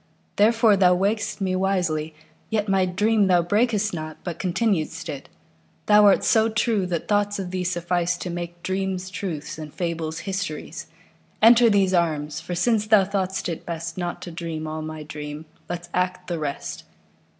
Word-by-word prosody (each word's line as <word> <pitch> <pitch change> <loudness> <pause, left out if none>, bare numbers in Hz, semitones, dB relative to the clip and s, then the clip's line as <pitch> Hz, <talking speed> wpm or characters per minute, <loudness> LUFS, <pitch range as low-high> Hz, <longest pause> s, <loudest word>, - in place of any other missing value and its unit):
Therefore 225 0 +5
thou 180 -2 +5
waked'st 205 +3 -1
me 185 -1 0
wisely; 175 -5 0 0.4
yetMy 195 -4 +1
dream 210 0 +3
thou 175 -2 +4
brak'st 210 +2 +1
not, 155 -2 -5
but 170 -2 -5
continued'st 175 -4 -1
it:Thou 140 - 0
art 200 - +5
so 220 0 +4
true 220 -4 +1
that 170 -3 -3
thoughts 205 0 +1
of 185 -2 -5
thee 185 0 -2
sufficeTo 175 0 -1
make 175 0 -6
dreams 190 0 -2
truths 160 -6 -5
and 155 -1 -7
fables 165 -2 -3
histories. 180 -5 -4 0.5
Enter 235 +1 +7
these 195 -3 +3
arms, 155 -4 0
for 175 - -5
since 215 +3 +1
thou 210 -2 +6
thought'st 190 -1 -2
it 165 -2 -4
bestNot 170 +1 -4
to 175 - -7
dream 165 -2 -5
all 155 0 -4
my 155 0 -6
dream, 150 +1 -7 0.2
let's 175 0 -5
act 180 0 -1
the 170 -2 -3
rest. 145 -2 -4
180 Hz, 155 wpm, -24 LUFS, 165-200 Hz, 0.5 s, Enter